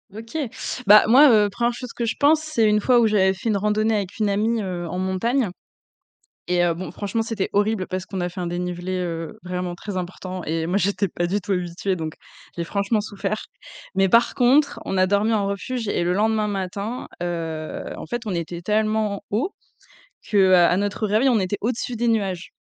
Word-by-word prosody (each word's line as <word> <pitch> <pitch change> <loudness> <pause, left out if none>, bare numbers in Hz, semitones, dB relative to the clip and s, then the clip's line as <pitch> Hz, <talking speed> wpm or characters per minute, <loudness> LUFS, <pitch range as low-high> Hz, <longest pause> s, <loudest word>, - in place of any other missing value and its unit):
OK. 225 +7 -7 0.5
Bah, 210 +1 +9
moi, 275 +6 +8
heu, 210 -3 +5
1re 240 +3 0
chose 245 0 -8
que 240 - -3
je 230 - -1
pense, 305 +2 +4
c'est 310 -8 +1
une 210 0 +3
fois 245 +2 +4
où 235 - +4
j'avais 195 -3 +3
fait 195 +4 -6
une 210 - +2
randonnée 215 +2 +1
avec 200 -3 -3
une 215 -2 +1
amie, 220 +3 +1
heu, 180 -3 -4
en 175 - -4
montagne 190 +6 0 1.0
et 180 0 +2
heu, 175 - +2
bon, 180 +3 -6
franchement, 205 +2 -3
c'était 220 -3 -2
horrible 205 -1 +1
parce 185 -1 -4
qu'on 190 -1 -5
a 175 - -1
fait 180 - -7
un 175 - -2
dénivelé, 175 +1 -3
heu, 165 -3 -4
vraiment 180 -1 -3
très 195 +2 -7
important 185 0 -6
et 160 +1 -2
moi, 180 +3 0
j'étais 200 0 0
pas 175 +1 -2
du 200 +4 -1
tout 195 - -2
habituée, 180 +1 -2
donc 160 -2 -5 0.4
j'ai 170 - -2
franchement 200 +5 0
souffert 205 0 -4 0.5
mais 195 0 +3
par 235 +3 +4
contre, 275 +4 +3
on 195 - -2
a 185 - +4
dormi 205 +3 +2
en 205 -2 +1
refuge 225 +4 -3
et 190 - 0
le 175 - +1
lendemain 215 +1 +1
matin, 200 +4 -4
heu, 165 -3 -4 0.2
en - - -6
fait, 240 0 -4
on 200 - -2
était 170 0 -4
tellement 215 0 0
haut 245 - -1 0.8
qu'à 185 -4 +5
notre 205 +2 -1
réveil, 215 +6 +3
on 230 -4 +3
était 190 +2 -1
au-dessus 240 +2 -2
des 235 +1 0
nuages, 195 -6 -1
200 Hz, 205 wpm, -23 LUFS, 180-220 Hz, 1.0 s, Bah